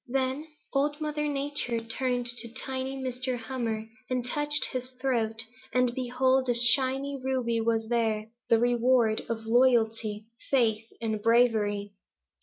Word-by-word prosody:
"Then 265 +4 -2 0.3
Old 290 +2 0
Mother 300 -1 -2
Nature 280 -4 -2
turned 245 +2 0
to 235 -1 +4
tiny 265 +2 -3
Mr. 255 -1 -4
Hummer 225 -2 -4 0.2
and 250 -1 -2
touched 295 +3 +6
his 255 -1 -3
throat, 225 -4 0 0.3
and 250 -1 +1
behold 260 +1 0
a 245 - +2
shining 265 +3 +2
ruby 250 -3 -1
was 225 -1 -1
there, 225 -2 -1 0.2
the 230 - +5
reward 240 -1 +2
of 225 -1 -4
loyalty, 225 -3 +1 0.2
faith, 225 -4 +1
and 220 -2 -2
bravery. 215 -3 +1
245 Hz, 130 wpm, -27 LUFS, 225-260 Hz, 0.3 s, touched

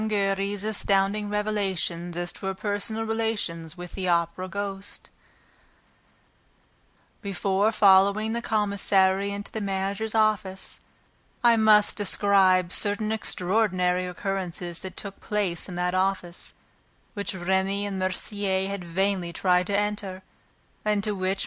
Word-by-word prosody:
Giry's 200 -1 0
Astounding 205 -1 +1
Revelations 190 -5 -1
as 175 0 -3
to 195 - -6
Her 190 - -2
Personal 210 +2 -2
Relations 210 -7 -2
with 175 0 -8
the 190 -2 -3
Opera 170 +1 +1
Ghost 195 +1 -6 2.1
Before 200 +1 +1
following 200 +1 +4
the 235 - -2
commissary 200 -3 +2
into 200 0 -6
the 220 - -4
manager's 200 +2 -2
office 210 -3 0 0.6
I 235 -1 +6
must 215 -2 +5
describe 190 -3 +3
certain 215 +1 0
extraordinary 185 -3 +1
occurrences 180 -2 -4
that 190 -1 -8
took 200 -1 -5
place 200 -4 -2
in 180 - -6
that 180 0 0
office 185 -2 -1 0.6
which 200 -2 -3
Remy 190 +2 0
and 195 -2 -3
Mercier 190 0 -1
had 200 -2 -4
vainly 180 0 -1
tried 180 0 +2
to 200 - +1
enter 205 -2 -2 0.6
and 215 - +2
into 210 - 0
which 190 0 -1
MM. - - -10
195 Hz, 125 wpm, -26 LUFS, 185-210 Hz, 2.1 s, I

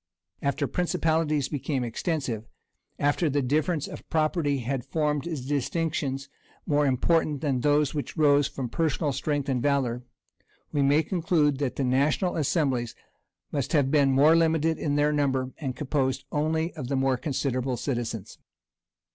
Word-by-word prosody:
After 140 +1 0
principalities 160 -3 0
became 140 -2 -2
extensive, 120 -2 -3 0.5
after 145 +3 +1
the 145 0 0
difference 150 +4 0
of - - -10
property 155 -2 +1
had 130 +1 -2
formed 150 -1 0 0.2
distinctions 140 -1 -1 0.4
more 145 -1 +2
important 150 +2 +1
than 140 -4 0
those 145 0 +2
which 150 +3 -4
arose 145 -2 +4
from 135 -3 -5
personal 150 0 0
strength 145 0 -1
and 130 -3 0
valor, 125 -3 0 0.7
we 145 - +1
may 145 +3 +4
conclude 155 -5 +1
that 140 -3 -1
the 140 - -1
national 140 +8 +1
assemblies 135 -6 0 0.6
must 140 +3 -2
have 140 -4 +3
been 140 -3 +4
more 145 +5 +5
limited 160 -1 +2
in 145 -2 -1
their 145 +1 +3
number, 135 -3 0
and 135 -5 -3
composed 135 -3 -1
only 160 +3 0
of 125 - -6
the 140 - -1
more 135 0 +2
considerable 130 -1 -2
citizens. 115 -7 -4
145 Hz, 145 wpm, -27 LUFS, 130-155 Hz, 0.7 s, more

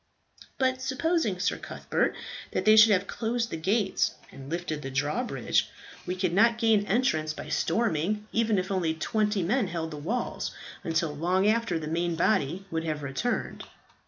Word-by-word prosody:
"But 260 -1 +1
supposing, 265 - 0
Sir 185 - -1
Cuthbert, - - -1 0.4
that - - -1
they 215 0 +7
should 220 +1 +8
have 200 -1 +3
closed 230 +2 -2
the - - -2
gates 195 +5 +1 0.2
and 135 0 -10
lifted 165 -2 -3
the 135 - -5
drawbridge? 145 - 0 0.4
We 180 - -1
could 185 -2 -1
not 230 +4 +4
gain 220 -3 +3
entrance 160 -10 +1
by - - -8
storming, 210 -1 0
even 225 -2 +2
if 185 +1 -2
only 170 -4 0
twenty 210 +3 0
men 220 +5 +1
held 165 -2 -4
the 150 - -6
walls, 205 +12 -3 0.3
until 165 -3 -1
long 180 +5 +1
after 220 -4 +2
the 160 - -5
main 170 +2 -1
body 170 0 +1
would 160 0 -1
have 155 -2 -3
returned." 140 - -2
190 Hz, 165 wpm, -28 LUFS, 160-225 Hz, 0.4 s, should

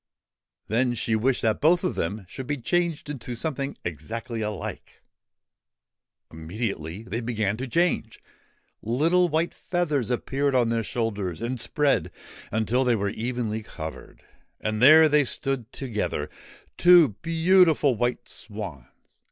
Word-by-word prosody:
Then 120 +3 +1
she 110 -1 0
wished 120 +3 +1
that 110 -2 +1
both 175 +5 +4
of 185 - 0
them 100 +4 -3
should 130 +6 -8
be 145 - -1
changed 170 +4 -1
into 125 -4 -6
something 140 +1 -3
exactly 110 - -5
alike! 105 -2 -6 1.3
Immediately 85 +1 -5
they 115 +3 -4
began 110 -3 -1
to 130 +3 -4
change. 165 -7 0 0.6
Little 165 +10 +2
white 160 +2 0
feathers 150 - -1
appeared 135 +3 0
on 120 -2 +3
their 115 0 +1
shoulders 100 -7 -3
and 120 +2 -3
spread 145 +4 +1 0.4
until 110 +4 +1
they 125 -2 +3
were 100 -2 -1
entirely 110 0 -3
covered; 80 -7 -9 0.4
and 110 0 -2
there 155 +4 +8
they 150 -1 +4
stood 130 -2 -2
together, 120 -6 -3 0.5
two 175 -4 +7
beautiful 165 -3 +4
white 120 +2 -2
swans 100 - -7
120 Hz, 130 wpm, -25 LUFS, 110-145 Hz, 1.3 s, there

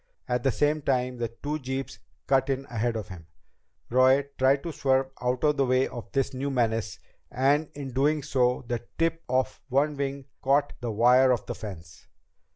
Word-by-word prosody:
At 125 0 0
the 135 - +2
same 150 +4 +1
time, 125 -2 0
the 120 -1 -1
two 145 +7 -5
jeeps 130 0 -5 0.3
cut 135 0 +2
in 135 0 -1
ahead 120 0 -1
of 110 -3 -5
him. 85 -4 -10 0.6
Roy 130 +3 +4
tried 135 +1 +3
to 170 - -4
swerve 135 -2 +1
out 125 0 -1
of 150 -1 +3
the 135 - +3
way 130 +1 +3
of 120 -2 -9
this 135 -1 0
new 135 +2 -2
menace, 115 -5 0 0.3
and 145 +4 +2
in 140 -2 -6
doing 145 +4 +1
so 125 -2 +1
the 120 -1 -3
tip 165 0 0
of 130 +1 0
one 145 +3 +2
wing 140 -1 -3 0.2
caught 140 +2 +2
the 120 - -3
wire 125 +4 +5
of 120 -4 +1
the - - -4
fence. 85 -6 -10
130 Hz, 185 wpm, -27 LUFS, 125-140 Hz, 0.6 s, wire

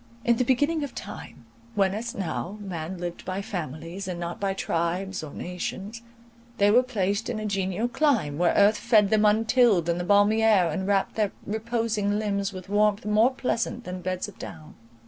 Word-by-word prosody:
In 235 -1 +4
the 250 - +2
beginning 290 +5 +1
of 280 - -6
time, 205 - -9 0.3
when, 195 -1 +2
as 230 +3 -4
now, 190 +1 -4
man 180 -3 -5
lived 175 0 -5
by 190 +2 -3
families, 170 +1 -5
and 180 -2 -4
not 170 0 -5
by 195 -1 -1
tribes 185 +2 -2
or 155 -2 -8
nations, 190 +6 -5 0.6
they 205 0 +4
were 245 +4 +6
placed 205 -4 -1
in 240 - -2
a 215 - -4
genial 195 +2 -1
clime, 235 - +1
where 175 -1 +3
earth 205 +1 +5
fed 215 -4 +4
them 215 -1 +4
untilled, 220 -3 +4
and 170 0 0
the - - -2
balmy 205 +4 +4
air 200 -7 +4
enwrapt 195 +3 0
their 210 -3 0
reposing 220 -2 -1
limbs 200 -2 -1
with 185 -2 -9
warmth 210 +1 +2
more 215 +3 +4
pleasant 245 -2 -2
than 180 0 -6
beds 185 +1 -2
of 205 - -13
down. 160 -2 -9
200 Hz, 185 wpm, -26 LUFS, 180-220 Hz, 0.6 s, were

